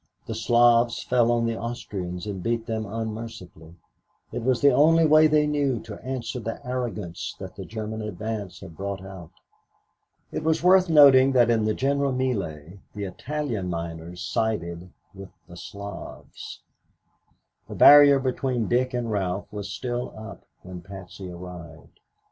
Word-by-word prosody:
The 115 - -5
Slavs 120 +1 +3
fell 120 -2 +2
on 120 -1 +1
the 115 -1 -2
Austrians 95 -7 -5
and 100 -3 -5
beat 115 +2 -2
them 110 -2 -3
unmercifully. 110 -6 -7 0.6
It - - -4
was 125 0 +1
the 140 +2 +5
only 160 +4 +5
way 155 0 +6
they 150 0 +3
knew 145 -4 0
to 105 -3 -10
answer 125 -1 -4
the 115 -1 -5
arrogance 120 -9 -4
that - - -9
the - - -8
German 110 0 -5
advance 105 -1 -5
had 95 -4 -11
brought 100 0 -5
out. 95 -4 -10 1.0
It - - -4
was 160 +1 +1
worth 185 0 +5
noting 135 -4 +7
that 120 -2 +4
in 110 -2 +1
the 110 - 0
general 140 +1 0
mêlée 100 - -3 0.2
the 105 - -4
Italian 115 0 -4
miners 85 0 -6
sided 90 -6 -2 0.2
with 95 -1 -10 0.2
the 85 - -12
Slavs. 100 +3 -9 1.1
The - - -7
barrier 145 -1 +8
between 130 -3 -1
Dick 125 +1 0
and 120 -2 -2
Ralph 95 0 -3
was 105 -1 -6
still 120 +3 -4
up 110 0 -10 0.2
when 90 -1 -9
Patsy 95 0 -10
arrived. 85 -2 -11
110 Hz, 150 wpm, -25 LUFS, 95-130 Hz, 1.1 s, barrier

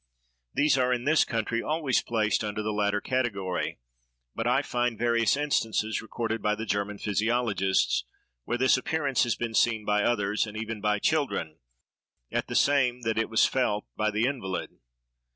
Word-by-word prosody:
These 145 -2 +3
are, 125 0 +2
in 125 -1 0
this 155 +3 +4
country, 115 0 -2
always 155 -4 0
placed 110 -2 0
under 105 0 -3
the 110 0 -2
latter 105 0 +1
category; 100 -9 -2 0.6
but 115 - -2
I 130 +3 +2
find 120 -3 -1
various 115 +1 +2
instances 110 -7 0
recorded 115 0 -3
by 105 0 +1
the 110 +1 -5
German 100 -1 -2
physiologists, 105 - +1 0.4
where 120 - -2
this 130 +1 +4
appearance 145 -1 0
has 120 - 0
been 115 -1 -4
seen 110 -1 +2
by 105 0 +2
others, 105 -1 +1
and 105 0 -8
even 110 -1 -4
by 105 0 +1
children, 100 - -1 0.7
at - - -1
the - - -5
same 130 -3 +3
that 110 -1 0
it 115 - 0
was 110 - +4
felt 105 -5 0
by 110 0 +1
the 105 +2 0
invalid. 120 -9 -3
115 Hz, 170 wpm, -27 LUFS, 105-125 Hz, 0.7 s, this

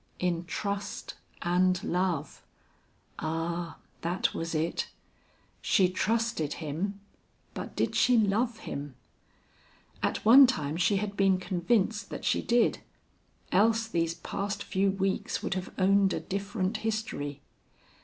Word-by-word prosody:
In 175 -1 -1
trust 200 +3 -4 0.3
and 180 +1 +2
love; 180 -4 -1 0.8
ah! 165 +2 -3 0.2
that 175 +3 0
was 165 0 -3
it. 160 +2 -1 0.7
She 190 -4 +3
trusted 220 -5 0
him, 175 +6 -4 0.5
but - - -6
did - - 0
she 250 -1 +4
love 220 +3 +1
him? 140 -2 -6 1.1
At - - -1
one 260 +5 +9
time 155 - -1
she 195 +4 +2
had 205 0 -2
been 195 -1 +3
convinced 200 +3 0
that - - -6
she - - +2
did, 240 0 +2 0.7
else 225 +4 +3
these 165 -5 0
past 200 +4 -4
few 195 0 +1
weeks 195 0 -1
would - - -1
have 185 0 -4
owned 195 0 +4
a - - -1
different 200 +1 -2
history. 215 -11 -3
190 Hz, 125 wpm, -29 LUFS, 170-210 Hz, 1.1 s, one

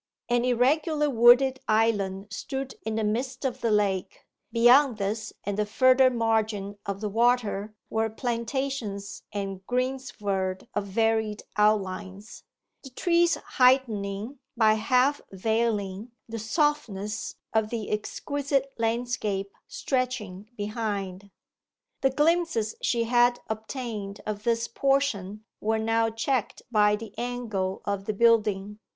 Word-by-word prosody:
An 240 0 +2
irregular 295 +5 +2
wooded 250 +2 +6
island 205 -3 +1
stood 265 +5 -4
in 220 0 -3
the 220 - 0
midst 245 +6 -2
of 255 - -2
the 230 - +1
lake; 200 -3 0 0.3
beyond 240 +2 +5
this 215 +2 -3
and 205 0 -3
the 210 - +2
further 255 +4 +5
margin 220 -4 -1
of 200 0 -3
the 215 - -1
water 220 -2 +1
were 225 0 0
plantations 235 -3 -3
and 195 -2 -4
greensward 210 -7 -2
of 205 -1 -2
varied 220 +1 0
outlines, 205 0 -1 0.4
the 270 - -10
trees 340 +5 +2
heightening, 235 -2 +1 0.2
by 220 -2 +5
half 250 +6 +2
veiling, 215 0 -1 0.2
the 230 0 -5
softness 220 - -1 0.2
of 220 -1 +2
the 225 -3 -4
exquisite 275 +5 -2
landscape 225 -4 -1 0.2
stretching 220 -7 -3
behind. 205 -3 -4 0.7
The 270 - +4
glimpses 295 -6 +1
she 235 -1 +1
had 240 +1 +3
obtained 220 -3 -5
of 210 0 -4
this 235 0 +1
portion 230 -7 0
were 220 +1 0
now 225 +1 +1
checked 225 +2 -2
by 210 -2 +4
the 215 -1 -9
angle 225 -6 -3
of 200 -1 -2
the 215 - -1
building. 210 -2 +2
225 Hz, 120 wpm, -27 LUFS, 205-250 Hz, 0.7 s, wooded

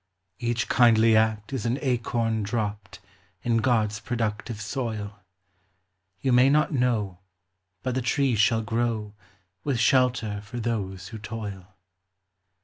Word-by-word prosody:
Each 120 -2 -1
kindly 115 -2 +5
act 110 +1 +1
is 120 -3 -2
an 120 +3 0
acorn 115 -4 0
dropped 105 -1 -3 0.4
In 115 -1 +2
God's 110 -3 +1
productive 115 -2 -3
soil. 105 -3 -4 1.0
You 130 -2 +2
may 125 +2 +6
not 150 +2 +3
know, 115 -8 0 0.6
but 130 - -1
the 130 - 0
tree 135 +1 +1
shall 110 +1 +3
grow, 110 -1 -1 0.5
With 135 -5 0
shelter 115 -4 +2
for 105 +4 -7
those 100 -5 -3
who 110 - -8
toil. 105 -3 -7
115 Hz, 125 wpm, -26 LUFS, 105-120 Hz, 1.0 s, may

